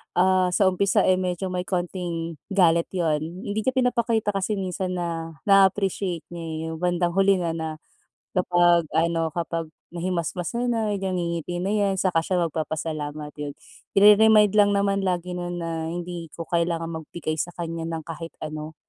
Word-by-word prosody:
ah, 185 0 +4
sa - - +3
umpisa 200 +2 +2
eh 185 0 +3
medyo 185 0 -2
may 180 0 -3
konting 175 -3 -3
galit 170 -4 +3
'yon, 160 -4 +1
hindi 185 +7 -4
niya 260 - +2
pinapakita 235 -4 +1
kasi 195 +1 -1
minsan 185 -1 -3
na 165 -2 -4
naa-appreciate 195 -3 +3
niya 170 -1 -6
eh, 160 - -4
yung 160 - -6
bandang 175 0 +1
huli 195 +1 +4
na 175 -2 -1
na 160 -1 -3 0.7
kapag 175 -2 +4
ano, 165 0 +1
kapag 165 -1 -3 0.3
nahimasmasan 180 +6 -2
na, 220 -2 0
ngingiti 175 -4 -2
na 195 - 0
'yan 200 -2 +2
saka 185 -3 +2
siya 180 +3 -1
magpapasalamat, 155 -1 -4
yun. 145 -1 -5 0.4
Ire-remind 210 +1 +7
lang 205 -1 +5
naman 200 0 +2
lagi 180 0 -1
nun 175 0 -4
na 165 -1 -3
hindi 175 0 -5
ko 165 - -5
kailangan 170 -1 0
magbigay 155 0 -5
sa 175 +3 -3
kanya 165 -1 -4
ng 165 -1 -4
kahit 165 +1 -8
ano. 155 0 -6
175 Hz, 160 wpm, -25 LUFS, 165-195 Hz, 0.7 s, Ire-remind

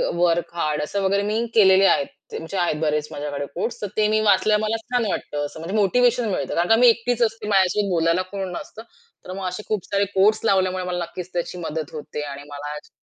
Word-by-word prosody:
Work-hard 170 -3 0
असं 200 +7 -2
वगैरे 200 +1 +2
मी 215 +3 0
केलेले 195 -2 +6
आहेत. 190 - +3 0.2
त्यांचे 165 +4 -5
आहेत 175 -3 +1
बरेच 150 -1 0
माझ्याकडे 145 -1 -4
कोट्स 220 +7 -3
तर 205 - -2
ते 215 -1 +4
मी 215 0 +2
वाचल्यावर 210 0 +3
मला 215 +1 0
छान 245 0 -1
वाटतं 145 -5 -3
असं, 145 - -9
म्हणजे 170 +6 -5
मोटिव्हेशन 240 +3 +3
मिळतं 190 - -2
कारण 170 +1 +1
का 225 - +7
मी 245 +2 +6
एकटीच 240 +1 +2
असते. 225 -1 -2
माझ्याशी 200 0 +2
बोलायला 170 0 +2
कोण 195 -2 -4
नसतं. 215 +4 -8 0.4
तर 185 - -6
मग 190 0 -4
असे 185 +3 -5
खूप 210 -5 -2
सारे 200 0 +1
कोट्स 210 +3 +4
लावल्यामुळे 185 -2 +2
मला 180 -1 -2
नक्कीच 175 +1 -7
त्याची 175 +1 -3
मदत 160 -3 -5
होते 150 -1 -6
आणि 140 +1 -9
मला 145 +1 -6
छा - - -23
190 Hz, 210 wpm, -22 LUFS, 165-215 Hz, 0.4 s, का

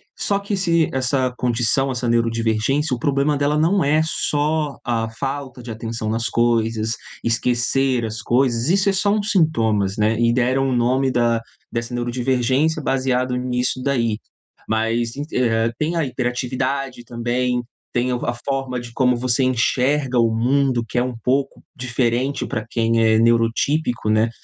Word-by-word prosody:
só 200 - 0
que 200 0 -3
se 170 -4 +2
essa 130 0 0
condição, 125 +2 +1
essa 125 -1 -2
neurodivergência, 115 +4 +1
o 120 - -9
problema 140 +2 +1
dela 145 +1 +1
não 170 +4 +3
é 150 +2 +3
só 150 -1 -1
a 115 -2 -1
falta 135 +1 -5
de 115 - -7
atenção 115 0 -4
nas 115 +2 -1
coisas, 115 -1 +1 0.3
esquecer 125 +1 +1
as 110 0 -5
coisas, 120 +1 +1
isso 195 +2 +3
é 195 - +2
só 200 +1 +1
um 210 -1 0
sintomas, 115 - +1
né. 110 +1 +1
E 120 0 +3
deram 130 +2 +1
o 130 - 0
nome 130 +3 +2
da 120 -2 +1 0.3
dessa 115 +1 -3
neurodivergência 130 +5 0
baseado 130 -1 0
nisso 125 0 -1
daí, 115 -6 0 0.5
mas 115 +1 0
en 145 - -4
eh, 115 -2 +1
tem 160 +3 -1
a 165 -3 +1
hiperatividade 130 +1 -2
também, 120 +1 -1 0.3
tem 125 +1 +1
o 125 - -3
a 120 - 0
forma 135 -2 -2
de 120 -1 -9
como 125 -1 +2
você 125 +2 0
enxerga 130 +1 +1
o 115 -1 +3
mundo, 125 +1 +1
que - - -4
é - - +2
um 125 -1 -4
pouco 135 +2 0
diferente 125 +2 -1
pra 110 -5 -3
quem 115 -1 +1
é 110 0 +4
neurotípico, 115 +2 +1
né, 110 +1 +3
125 Hz, 160 wpm, -21 LUFS, 115-135 Hz, 0.5 s, é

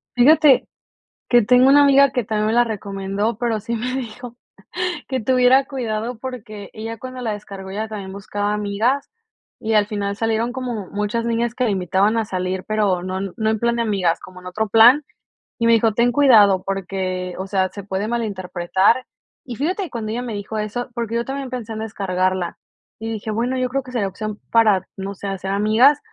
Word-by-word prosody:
Fíjate 285 +2 +5 0.6
que 240 -1 +5
tengo 250 +4 +5
una 285 +1 +7
amiga 280 0 +6
que 250 -3 -1
también 215 0 -1
me - - +1
la 240 +1 +4
recomendó, 205 0 -3
pero 230 -3 -1
sí 230 +3 -3
me 250 +3 -3
dijo 245 -1 -6 0.7
que 260 -1 -1
tuviera 255 +3 +4
cuidado 235 -3 -3
porque 220 -5 -8
ella 225 +1 -6
cuando 255 +3 -8
la 225 -3 -2
descargó 195 -2 -9
ella 215 +3 -4
también 200 -3 -6
buscaba 205 +1 -3
amigas 210 +7 0 0.5
y 220 0 -2
al 210 -1 +3
final 200 -1 -3
salieron 225 +2 -1
como 245 -7 -4
muchas 210 +3 -2
niñas 235 0 0
que 250 +1 0
la - - +1
invitaban 190 +3 +1
a 225 - +1
salir, 185 -1 -3
pero 205 -4 0
no 185 +1 -3 0.2
no 220 -2 0
en 220 - 0
plan 235 +1 +1
de 235 - 0
amigas, 195 -7 +1
como 185 0 -12
en 180 - -11
otro 215 +4 -2
plan 235 +7 +7 0.6
y 230 - +1
me 230 - +5
dijo 225 -1 +3
ten 235 +3 +3
cuidado 215 -9 +5
porque, 185 -1 -3
o 190 - -4
sea, 190 -1 +1
se 200 - -9
puede 200 +2 -3
malinterpretar 195 0 0 0.4
y 245 - -6
fíjate 360 - -2
cuando 220 -2 -4
ella 240 - -2
me 240 -3 -5
dijo 205 +1 -5
eso 215 +4 -3
porque 230 -1 -3
yo 235 - 0
también 270 +1 -5
pensé 240 -3 -6
en 220 - -5
descargarla 185 -4 -2 0.4
y 225 - -5
dije: 220 0 -4
"Bueno, 240 +4 -1
yo 255 0 0
creo 275 +2 -1
que 255 - -11
sería 220 -5 0
opción 215 +2 -6
para, 215 -5 +4
no 195 +1 -5
sé, 200 - -7
hacer 195 -1 -4
amigas", 220 +8 +4
220 Hz, 200 wpm, -21 LUFS, 200-245 Hz, 0.7 s, una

